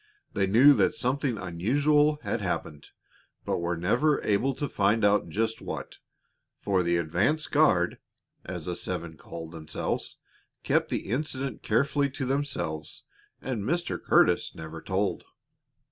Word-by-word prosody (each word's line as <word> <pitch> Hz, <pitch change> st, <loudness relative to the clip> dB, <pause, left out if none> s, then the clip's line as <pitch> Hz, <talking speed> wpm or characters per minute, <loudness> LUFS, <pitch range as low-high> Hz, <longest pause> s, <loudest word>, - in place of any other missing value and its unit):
They 100 Hz, -3 st, +1 dB
knew 125 Hz, +9 st, +7 dB
that -, -, +2 dB
something 130 Hz, -1 st, 0 dB
unusual 145 Hz, -, +2 dB
had 115 Hz, -, -2 dB
happened, 80 Hz, -5 st, -4 dB, 0.6 s
but -, -, -1 dB
were 85 Hz, 0 st, -1 dB
never 125 Hz, -, +2 dB
able 125 Hz, +6 st, +1 dB
to 145 Hz, -, -2 dB
find 105 Hz, 0 st, +2 dB
out 105 Hz, -3 st, +3 dB
just 110 Hz, +6 st, -1 dB
what, -, -, -6 dB, 0.6 s
for 95 Hz, -2 st, +1 dB
the 85 Hz, 0 st, +1 dB
"advance 90 Hz, -, +1 dB
guard," 95 Hz, -, +2 dB, 0.4 s
as 90 Hz, -3 st, -5 dB
the 90 Hz, -, -3 dB
seven 85 Hz, -3 st, -3 dB
called 80 Hz, +1 st, -9 dB
themselves, 80 Hz, -2 st, -4 dB, 0.5 s
kept -, -, +1 dB
the -, -, -3 dB
incident 135 Hz, -2 st, -2 dB
carefully 140 Hz, +5 st, +1 dB
to 130 Hz, 0 st, -4 dB
themselves, 130 Hz, -, -3 dB, 0.4 s
and 125 Hz, -5 st, -2 dB
Mr. 170 Hz, +10 st, -2 dB
Curtis -, -, +3 dB
never 80 Hz, 0 st, -8 dB
told. 95 Hz, +2 st, -1 dB
105 Hz, 135 wpm, -27 LUFS, 85-140 Hz, 0.6 s, knew